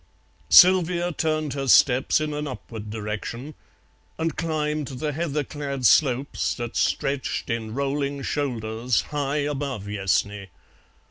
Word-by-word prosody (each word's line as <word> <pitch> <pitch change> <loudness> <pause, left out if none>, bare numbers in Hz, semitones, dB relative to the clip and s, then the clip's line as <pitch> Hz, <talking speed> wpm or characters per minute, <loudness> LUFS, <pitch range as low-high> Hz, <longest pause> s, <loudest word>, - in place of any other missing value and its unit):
Sylvia 180 -1 +6
turned 155 -2 -1
her 135 -1 -3
steps 130 +2 +5
in 155 -1 -2
an 150 0 -3
upward 115 -5 -8
direction 110 +6 -5 0.6
and 160 -1 -1
climbed 155 -3 -2
the 150 +3 -3
heather 150 -1 -2
clad 140 -2 -5
slopes 135 +1 +2
that 120 -2 -6
stretched 135 -2 -1
in 115 -1 -3
rolling 140 0 -2
shoulders 120 -5 -1
high 145 0 -1
above 140 -6 -3
Yessney. 100 0 -1
140 Hz, 120 wpm, -24 LUFS, 120-150 Hz, 0.6 s, Sylvia